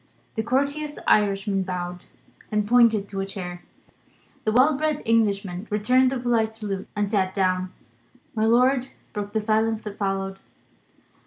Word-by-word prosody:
The 220 - -1
courteous 280 +5 -1
Irishman 200 -1 +2
bowed, 180 -1 -4 0.5
and 210 -1 0
pointed 230 -3 +4
to 195 -1 -4
a - - -2
chair. 180 -3 -6 0.8
The 215 - +2
well 260 +6 +5
bred 305 0 -1
Englishman 200 -4 +1
returned 250 +5 +3
the 270 - -1
polite 230 -2 +1
salute, 200 -3 -4
and 205 0 0
sat 190 -2 0
down. 185 -1 +1 0.6
My 220 0 +1
lord 250 +2 +3 0.3
broke 205 -1 -4
the 220 - +2
silence 220 +1 +1
that 205 -1 -8
followed. 195 -1 -2
210 Hz, 145 wpm, -24 LUFS, 195-235 Hz, 0.8 s, well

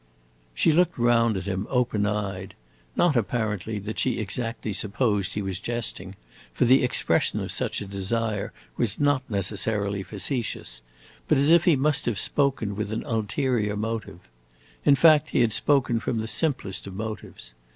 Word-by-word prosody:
She 160 - +3
looked 175 +2 +2
round 115 -3 +3
at 95 - -4
him, 100 +2 -3
open 120 -5 +1
eyed; 100 -2 -3 0.4
not, 175 -5 +3
apparently, 110 -2 -1
that 105 +2 -5
she 125 -3 +1
exactly 110 +1 -4
supposed 105 -1 0
he 105 - -2
was 95 -2 -3
jesting, 110 -5 -3 0.4
for - - +3
the 130 +2 +5
expression 125 - +1
of - - -3
such - - -1
a - - -5
desire 100 +2 -2 0.3
was 115 -5 0
not 145 -2 +3
necessarily 100 0 -1
facetious; 100 - -3 0.5
but - - +3
as 140 +3 +4
if 170 0 +6
he 170 - +5
must 145 0 +1
have 115 -4 0
spoken 135 -5 +1
with 105 0 -3
an 110 - -3
ulterior 110 -1 -1
motive. 110 -4 -4 0.6
In 140 - +6
fact, 155 +1 +5
he - - +2
had 115 -3 +3
spoken 125 -3 +2
from 120 0 -2
the 110 - -3
simplest 125 - -2
of 95 - -8
motives. 105 - -7
110 Hz, 160 wpm, -25 LUFS, 100-125 Hz, 0.6 s, if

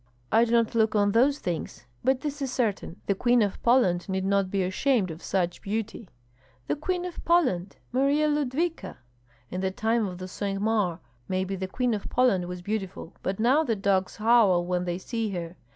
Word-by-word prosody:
"I 225 +2 +5
do 230 - -4
not 230 -1 +3
look 220 -1 +2
on 205 -1 +3
those 260 +6 +3
things; 160 - -5 0.2
but 265 0 +2
this 290 0 -4
is 270 -2 -2
certain, 210 -8 -2
the 200 - +2
Queen 240 +3 +3
of 200 - -3
Poland 200 -8 +3
need 190 0 -1
not 195 -1 +1
be 195 0 0
ashamed 190 +1 +1
of 160 +2 -9
such 175 -2 -1
beauty." 215 -1 -4 0.6
"The - - -1
Queen 355 +4 -2
of 360 - -7
Poland? 255 - +2 0.2
Marya 280 +4 +2
Ludvika? 300 +3 -1 0.5
In 185 - -3
the 190 - +1
time 220 +3 0
of 185 0 -6
Cinq 195 +1 -3
Mars 205 -5 +1 0.3
maybe 190 +1 -1
the 190 0 -4
Queen 245 +4 0
of 205 -2 -4
Poland 220 -9 +2
was 180 0 -7
beautiful, 195 -4 -4
but 190 +2 -3
now 260 +8 +4
the 235 -7 0
dogs 195 -2 0
howl 210 -6 +4
when 180 0 -1
they 175 -1 -2
see 225 +3 -3
her. 170 -1 -5
210 Hz, 190 wpm, -27 LUFS, 185-250 Hz, 0.6 s, I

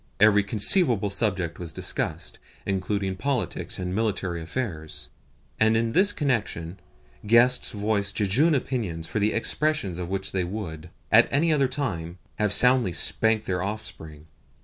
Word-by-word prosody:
Every 105 0 +5
conceivable 105 - +4
subject 95 -5 -2
was 85 -2 -5
discussed, - - -3 0.3
including 95 0 -2
politics 125 - -2
and 90 0 -4
military 95 -5 -2
affairs; 80 -4 -5 0.5
and 110 +1 +3
in 115 0 -1
this 195 - +4
connection 105 - -3 0.5
guests 120 +3 +3
voiced 105 -1 -1
jejune 130 - +3
opinions 110 -12 -3
for 110 - -3
the 105 +1 +1
expression 115 - 0
of 90 -1 -5
which 95 0 -3
they 95 -1 -1
would, 90 -4 -7 0.2
at - - +5
any 160 +3 +2
other 140 -3 +2
time, 95 - -4 0.2
have 105 -2 +1
soundly 125 -4 +4
spanked 110 +6 +3
their 90 -3 -2
offspring. 90 -7 -7
105 Hz, 140 wpm, -25 LUFS, 90-120 Hz, 0.5 s, Every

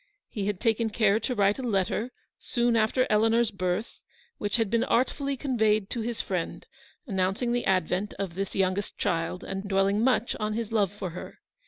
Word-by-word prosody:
He 200 -2 -3
had 205 -3 -1
taken 225 -1 +1
care 215 -1 +3
to 250 +1 -2
write 200 +2 +3
a - - -2
letter, 220 +1 0 0.3
soon 240 -1 +1
after 225 +3 +3
Eleanor's 225 +2 +3
birth, 185 +2 -2 0.4
which 205 - -1
had 225 -4 +1
been 230 0 +3
artfully 275 +3 0
conveyed 220 -7 +1
to 235 - -2
his 230 0 -2
friend, 180 -3 -3 0.4
announcing 195 +2 0
the 245 0 0
advent 185 +2 0
of 195 -4 -4
this 195 +2 -4
youngest 190 +1 0
child, 170 +2 -1
and 195 +1 -5
dwelling 195 +1 +2
much 250 -2 +2
on 215 0 -1
his 225 -1 -3
love 205 -4 +2
for 195 -3 -5
her. 180 - -8
210 Hz, 180 wpm, -27 LUFS, 195-235 Hz, 0.4 s, care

